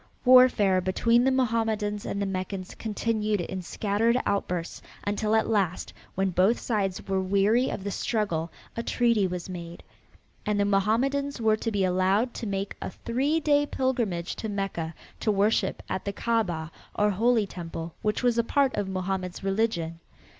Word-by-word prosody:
Warfare 245 -7 +6
between 230 +6 +2
the - - +5
Mohammedans 225 -5 0
and 200 - -2
the 200 - 0
Meccans 185 0 -4
continued 215 -1 -1
in 185 +2 -4
scattered 215 +6 +1
outbursts 180 -4 -2 0.2
until 210 +1 +1
at 220 - +2
last 195 -6 0 0.2
when 190 0 +1
both 190 +7 +3
sides 195 -5 -2
were 190 -1 +1
weary 200 +6 +2
of - - -4
the 200 - -3
struggle 180 -8 -1 0.2
a 230 - -2
treaty 235 -4 +2
was 180 -1 -5
made, 170 -2 -8 0.6
and 210 -1 0
the 200 - +3
Mohammedans 240 +8 +1
were 220 -1 +3
to 225 - -2
be 205 -3 0
allowed 190 +6 +2
to 230 - -5
make 195 0 -3
a - - -3
three 270 +10 0
day 290 -2 +2
pilgrimage 235 -12 -1
to 220 - -4
Mecca 195 -5 -3 0.2
to 215 - +1
worship 200 -1 +1
at 190 - -3
the 200 - -2
Kaabah 180 -9 -1 0.2
or 210 0 +3
holy 225 +2 +2
temple 165 -3 -7
which 210 +3 -1
was 240 -1 +3
a - - +3
part 275 +2 +2
of 205 -2 -2
Mohammed's 185 -1 -3
religion. 195 -5 -1
205 Hz, 165 wpm, -27 LUFS, 185-230 Hz, 0.6 s, Warfare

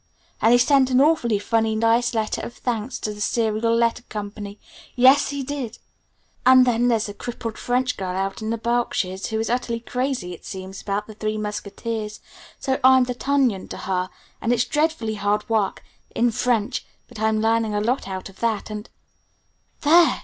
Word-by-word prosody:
And 225 - +5
he 245 - +7
sent 265 +1 +4
an 255 0 +3
awfully 275 -7 +3
funny, 225 +1 +1
nice 230 +2 +2
letter 220 -1 -1
of 240 - -7
thanks 240 0 -3
to 210 - -2
the 210 - -9
Serial 225 +1 +1
Letter 235 +1 +2
Co. 205 -1 -4 0.6
yes, 260 +3 +6
he 280 -1 -3
did! 255 -4 -5 0.7
And 255 0 +7
then 240 0 +2
there's 225 -3 +2
a 205 - -6
crippled 230 0 -6
French 250 +1 0
girl 185 -1 -3
out 195 +3 -2
in 215 - -3
the 230 - 0
Berkshires 220 -5 -1
who 220 -1 -2
is 225 - -1
utterly 235 -1 -1
crazy, 250 -6 -2
it 170 - -12
seems, 190 0 -7
about 205 +1 -2
the 215 - -10
'Three 215 0 -2
Musketeers', 210 +1 -4 0.4
so 265 -1 -1
I'm 260 0 +7
d'Artagnan 250 -4 0
to - - -7
her, 185 -1 -2 0.3
and 230 - 0
it's 245 0 +2
dreadfully 295 -8 0
hard 205 +1 0
work 215 -4 0 0.3
in 240 0 +3
French 235 0 0 0.2
but - - -11
I'm 220 0 +2
learning 225 -1 +1
a - - +2
lot 235 +2 0
out 190 -1 -5
of 195 -1 -16
that, 225 -2 -1
and 210 +1 -6 0.5
" - - -43
"There. 335 +3 +5
230 Hz, 185 wpm, -23 LUFS, 210-250 Hz, 0.7 s, he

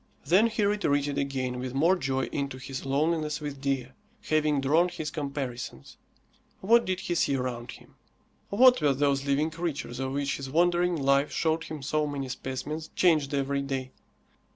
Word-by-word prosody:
Then 195 +7 +5
he 215 -2 -1
retreated 145 -9 +1
again 130 -3 -2
with 130 0 -5
more 165 +7 +4
joy 135 -5 -1
into 140 -2 -3
his 130 +1 -6
loneliness 150 +1 0
with 145 -2 -6
Dea, 135 -3 -1 0.3
having 155 -3 +1
drawn 155 +6 +3
his 160 -4 -5
comparisons. 140 - -5 0.6
What 235 +4 +4
did 185 0 -2
he 175 - -2
see 140 -4 +1
around 125 -2 -4
him? - - -16 0.6
What 250 +1 +6
were 145 -2 +3
those 140 0 +1
living 145 +3 +1
creatures 160 -7 -4
of 135 0 -2
which 140 0 -1
his 135 -1 -6
wandering 175 +3 +2
life 140 -1 +2
showed 160 0 0
him 155 -3 -7
so 150 +2 0
many 140 -2 -4
specimens, 140 +5 -5
changed 155 -5 +3
every 140 0 0
day? 135 -2 -4
145 Hz, 165 wpm, -28 LUFS, 135-160 Hz, 0.6 s, What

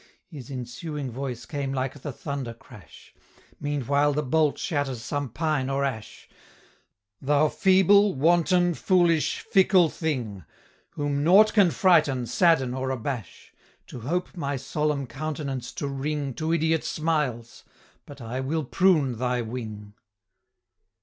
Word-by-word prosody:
His 140 -6 -10
ensuing 135 +2 -5
voice 125 -1 -5
came 140 -3 -4
like 135 +1 -3
the 145 - -5
thunder 135 -3 -5
crash 115 -4 -16 0.5
Meanwhile 145 0 +1
the 150 +1 -1
bolt 150 +1 +1
shatters 135 -7 -2
some 145 +4 -3
pine 150 0 -1
or 135 +1 0
ash 110 -6 -6 0.9
"Thou 145 +2 +2
feeble, 195 +2 +4
wanton, 175 +4 +3
foolish, 170 -2 +2
fickle 190 -3 +4
thing! 120 - -3 0.5
Whom 145 -1 -1
nought 200 +7 +6
can 200 -5 +5
frighten, 155 -9 +3
sadden, 135 -1 +2
or 130 0 -3
abash, 125 - -5 0.3
To - - -9
hope 175 +11 -3
my 140 -5 -2
solemn 150 +1 -2
countenance 140 -1 -5
to 145 - -4
wring 140 0 -3
To 155 +5 -3
idiot 160 -1 +1
smiles! 150 -8 -2 0.4
but 145 - -11
I 120 +3 -5
will 155 +4 -1
prune 145 - +2
thy 125 -1 0
wing!" 110 -3 -7
145 Hz, 130 wpm, -25 LUFS, 130-160 Hz, 0.9 s, nought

